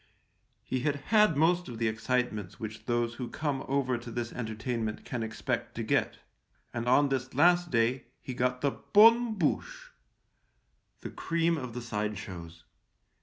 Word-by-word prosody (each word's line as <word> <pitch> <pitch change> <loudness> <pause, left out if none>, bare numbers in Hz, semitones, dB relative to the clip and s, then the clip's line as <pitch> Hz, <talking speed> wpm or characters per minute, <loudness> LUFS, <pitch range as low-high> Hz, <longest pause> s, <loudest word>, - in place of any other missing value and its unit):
He 130 - -2
had 145 +2 0
had 210 +3 +3
most 175 +3 +3
of 120 - -7
the 115 0 0
excitements 110 -3 -2
which 110 0 -7
those 120 -1 0
who 120 0 -6
come 145 -4 -2
over 130 -3 0
to 120 - -9
this 120 0 -4
entertainment 110 -1 -3
can 125 -3 -4
expect 110 0 -3
to - - -3
get, - - 0 0.6
and 120 0 -3
on 140 +3 +5
this 130 -1 -2
last 175 +4 +4
day 120 +1 +1
he 130 - -6
got 125 +1 0
the 140 - +2
bonne 230 - +5
bouche - - -2 0.5
— - - -44
the - - -6
cream 165 0 0
of 125 -6 -6
the 125 - -4
side 105 -3 -2
shows. 85 -4 -9
125 Hz, 165 wpm, -30 LUFS, 115-150 Hz, 0.6 s, on